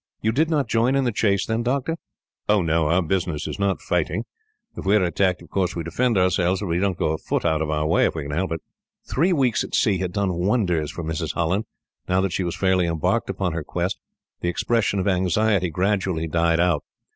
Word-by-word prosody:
"You 110 - +1
did 155 +7 +1
not 145 -6 +1
join 115 +3 +2
in 135 - +2
the 125 - +1
chase 100 -2 +1
then, 110 +1 -1
doctor?" 135 +6 -1 0.5
"Oh, 105 -3 +4
no. 80 -1 +1
Our 85 +3 +3
business 85 -2 -1
is - - -5
not 100 -1 0
fighting. - - -1 0.5
If - - -6
we 100 +2 +3
are 105 - +4
attacked, 90 +1 +1
of - - -17
course 95 -2 0
we 85 - -3
defend 115 +8 0
ourselves; 90 0 +2
but - - -2
we 85 -1 0
don't 95 -2 0
go - - 0
a 80 - -2
foot - - -2
out 80 -2 +2
of 80 - -1
our 75 0 0
way, 85 +3 +3
if - - -1
we 80 - -3
can 70 - -6
help 90 +5 -1
it." 80 - -5 0.5
Three 170 +8 +2
weeks 130 - +2
at - - -4
sea 100 -4 +2
had 90 -1 -2
done 100 -1 0
wonders 90 -4 +1
for 85 +2 -6
Mrs. 80 0 -3
Holland. 90 +6 0 0.4
Now 90 +1 +3
that 95 -3 -1
she 95 - 0
was 85 -1 -2
fairly 95 -2 +2
embarked 80 -2 0
upon 90 -4 -1
her 80 -1 -3
quest, 90 +5 -2 0.4
the 85 - -1
expression 105 +2 0
of 95 - -1
anxiety 95 +1 +2
gradually 95 -1 0
died 85 +1 +2
out. 90 0 +2
95 Hz, 230 wpm, -23 LUFS, 85-105 Hz, 0.5 s, Oh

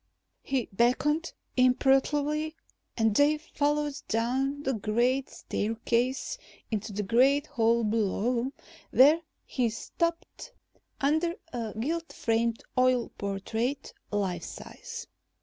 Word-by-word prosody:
He 265 -3 -1
beckoned 295 - +2 0.2
imperatively 285 +4 +2 0.4
and 225 -2 +2
they 290 +3 +5
followed 295 -1 -1
down 265 +5 0
the 265 - 0
great 240 +5 +1
staircase 235 - -1 0.3
into 215 0 -2
the 205 +1 -2
great 265 +8 +4
hall 235 -5 +2
below, 230 +4 0 0.4
where 295 +6 +6 0.2
he 245 -3 0
stopped 335 - -3 0.5
under 315 +5 +1 0.2
a 230 -3 -4
gilt 330 +7 -2
framed 230 0 0
oil 255 -2 +3
portrait, 220 +7 -2 0.2
life 195 -4 -1
size. 470 -1 -8
255 Hz, 100 wpm, -29 LUFS, 225-290 Hz, 0.5 s, where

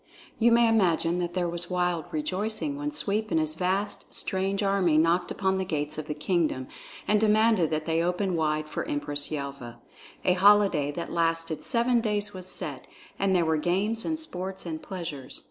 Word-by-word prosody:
You 235 +1 +5
may 235 0 +5
imagine 180 -6 +2
that 175 0 -3
there 180 -1 +1
was 175 +1 -2
wild 180 -3 0
rejoicing 210 - -2
when 295 +1 -3
Sweep 220 -7 -1
and 160 - +2
his 155 0 0
vast 185 +5 -2
strange 195 +1 -1
army 195 -5 +2
knocked 170 +3 +2
upon 190 -1 0
the - - 0
gates 150 -4 -2
of 155 - -6
the 150 - -3
kingdom 150 -4 0 0.4
and 210 0 +3
demanded 215 -5 +3
that 155 0 -2
they 165 0 +1
open 180 +2 0
wide 155 -1 0
for - - -3
Empress 145 0 -1
Yelva. 140 -5 -6 0.5
A 180 - +5
holiday 190 -6 +4
that 170 +4 -5
lasted 165 -1 0
seven 240 -1 +2
days 210 -2 -1
was 185 -1 -7
set, - - -4 0.3
and 195 -1 +2
there 175 -2 +3
were 160 0 +2
games 200 +8 0
and 315 -1 -2
sports 190 - -5
and 160 -2 -5
pleasures. 165 -9 -6
180 Hz, 180 wpm, -27 LUFS, 160-205 Hz, 0.5 s, You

